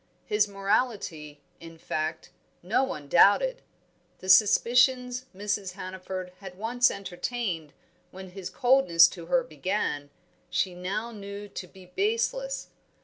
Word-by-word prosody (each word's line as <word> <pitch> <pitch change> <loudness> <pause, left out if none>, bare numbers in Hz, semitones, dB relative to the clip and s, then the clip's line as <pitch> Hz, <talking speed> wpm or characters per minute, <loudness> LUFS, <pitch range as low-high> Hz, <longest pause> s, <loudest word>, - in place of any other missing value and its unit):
His 210 0 +2
morality, 195 - -2 0.2
in 165 0 -12
fact, 160 +2 -4 0.3
no 215 +9 +2
one 150 - -5
doubted; 480 - +4 0.6
the 185 - -8
suspicions 250 +5 +4
Mrs. 200 -1 -2
Hannaford 185 -1 -6
had 190 -2 -10
once 245 +4 +2
entertained 185 -3 -4 0.4
when 190 0 -10
his 190 -1 -7
coldness 245 -11 +5
to 170 -3 -10
her 260 +6 +2
began, 155 - -2 0.4
she 185 - 0
now 200 +6 -4
knew 200 -1 -8
to 185 - -7
be 190 0 -15
baseless. 465 - -1
195 Hz, 120 wpm, -27 LUFS, 180-245 Hz, 0.6 s, coldness